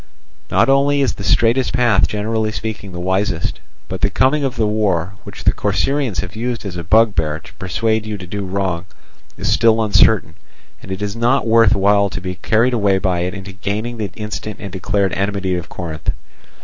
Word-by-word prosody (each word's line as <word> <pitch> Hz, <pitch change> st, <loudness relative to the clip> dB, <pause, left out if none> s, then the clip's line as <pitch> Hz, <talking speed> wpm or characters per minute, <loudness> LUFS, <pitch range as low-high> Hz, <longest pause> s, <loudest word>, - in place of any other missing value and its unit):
Not -, -, +3 dB
only 140 Hz, +1 st, +3 dB
is 135 Hz, -, +1 dB
the 100 Hz, -, -8 dB
straightest 120 Hz, +5 st, +2 dB
path 120 Hz, -3 st, +3 dB
generally 110 Hz, +1 st, -1 dB
speaking 110 Hz, -3 st, -5 dB
the 90 Hz, -, -6 dB
wisest; 95 Hz, -1 st, -1 dB, 0.3 s
but -, -, -5 dB
the -, -, +3 dB
coming 140 Hz, +3 st, +2 dB
of 130 Hz, -2 st, -1 dB
the 115 Hz, -2 st, +1 dB
war, 100 Hz, -4 st, 0 dB
which -, -, -9 dB
the -, -, +4 dB
Corcyraeans 105 Hz, -, 0 dB
have 95 Hz, +2 st, -8 dB
used 115 Hz, 0 st, -3 dB
as 95 Hz, -3 st, -5 dB
a 85 Hz, -, -4 dB
bugbear 85 Hz, -5 st, +3 dB
to 85 Hz, -, -15 dB
persuade 110 Hz, +4 st, -1 dB
you 105 Hz, -1 st, -3 dB
to 95 Hz, -, -8 dB
do 100 Hz, +3 st, -4 dB
wrong, 95 Hz, -3 st, -2 dB, 0.5 s
is -, -, -1 dB
still 115 Hz, -1 st, +4 dB
uncertain, 105 Hz, -4 st, +3 dB, 0.5 s
and -, -, -9 dB
it 95 Hz, +2 st, -4 dB
is 100 Hz, +1 st, -3 dB
not 120 Hz, +4 st, +2 dB
worth 115 Hz, -2 st, +5 dB
while 100 Hz, +1 st, +3 dB
to 95 Hz, -, -5 dB
be 90 Hz, 0 st, -4 dB
carried 115 Hz, +7 st, +1 dB
away 100 Hz, -4 st, +2 dB
by 95 Hz, -2 st, 0 dB
it 90 Hz, +3 st, -2 dB
into 95 Hz, 0 st, -8 dB
gaining 105 Hz, +4 st, -4 dB
the 105 Hz, -2 st, -2 dB
instant 105 Hz, 0 st, -5 dB
and 100 Hz, -, -7 dB
declared 95 Hz, +1 st, 0 dB
enmity 100 Hz, -1 st, -1 dB
of 90 Hz, 0 st, -4 dB
Corinth. 80 Hz, -4 st, -5 dB
105 Hz, 195 wpm, -18 LUFS, 95-115 Hz, 0.5 s, worth